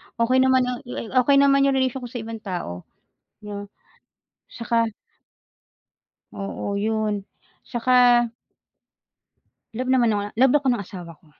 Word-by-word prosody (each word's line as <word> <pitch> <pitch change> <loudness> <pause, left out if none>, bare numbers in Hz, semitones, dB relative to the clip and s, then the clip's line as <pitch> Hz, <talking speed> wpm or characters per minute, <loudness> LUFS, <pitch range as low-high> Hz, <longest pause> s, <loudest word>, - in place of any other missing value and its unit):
Okay 245 +2 +2
naman 260 0 +4
a 250 - -2
li 230 -2 -6
okay 255 +2 +4
naman 275 0 +5
'yong 275 - +2
relation 260 0 0
ko 245 - -6
sa 245 -1 -6
ibang 225 0 -7
tao. 175 - -5 0.6
Yeah, 205 -1 -7 0.8
saka 230 -1 0 1.4
oo, 200 0 -5
'yon, 215 -2 -1 0.4
saka 240 -1 +3 1.4
love 255 +3 -4
naman 245 -4 +3
ako 205 - 0
ng - - -18
love 260 +3 +4
ako 285 -2 -2
ng 240 -5 +1
asawa 175 -3 -9
ko. - - -26
235 Hz, 135 wpm, -23 LUFS, 210-255 Hz, 1.4 s, naman